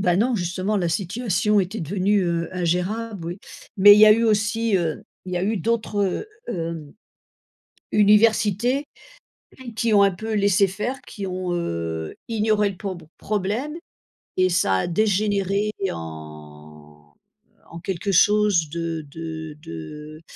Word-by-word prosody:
Bah 180 -3 +2
non, 240 +5 +2
justement, 185 +2 -1
la 175 -3 0
situation 200 +3 0
était 195 +4 -3
devenue 195 +4 +1
heu, 170 -1 -1
ingérable, 180 +3 -2
oui. 175 +3 -5 0.4
Mais 205 +1 +9
il - - +4
y 215 - +9
a 215 - +9
eu 230 +2 +2
aussi, 220 0 +1
heu, 165 -4 -2 0.2
il 185 - -6
y - - -1
a 175 - -1
eu 215 +1 0
d'autres, 220 0 -1
heu, 195 - -1 0.2
hem, 165 -3 -4 1.0
universités 215 +4 +3 0.9
qui 225 0 +1
ont 200 - +6
un 200 - +5
peu 220 +4 -4
laissé 200 -1 +3
faire, 240 +8 -4
qui 200 -2 -7
ont, 185 -1 -3
heu, 85 - -3
ignoré 215 -2 +1
le 190 - -10
prob 190 -3 -6 0.2
problème 215 +9 -2 0.6
et 185 0 +4
ça 135 - +2
a 95 - 0
dégénéré 205 +1 +1 0.2
en, 75 -1 -11 0.6
en 170 - -8
quelque 190 +2 -3
chose 200 -4 +3
de 165 -1 -4
de 160 -1 -7
de 150 - -9
190 Hz, 145 wpm, -23 LUFS, 165-210 Hz, 1.0 s, Mais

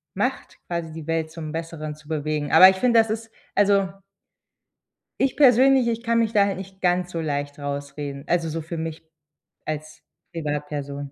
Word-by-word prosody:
macht, - - -2
quasi 170 -2 -3
die 160 -1 -8
Welt 165 -1 -1
zum 160 -2 -7
Besseren 160 -1 -5
zu 155 0 -19
bewegen. 150 -1 -2
Aber 185 - +10
ich 190 - 0
finde, 235 +2 +4
das 225 - +3
ist 225 0 -5 0.2
also 200 -1 +3 1.3
Ich 270 - +1
persönlich, 265 -1 +5
ich 230 0 -2
kann 230 -1 +1
mich 225 -1 0
da 205 -3 +4
halt 195 - -2
nicht 190 0 -10
ganz 180 0 +1
so 165 - -2
leicht 145 -2 -3
rausreden. 140 0 -5
Also, 170 -2 +1
so 165 +1 -3
für 165 +1 -6
mich 160 0 -5 0.6
als 155 0 -6 0.3
Privatperson. 145 -3 -4
165 Hz, 175 wpm, -24 LUFS, 150-200 Hz, 1.3 s, Aber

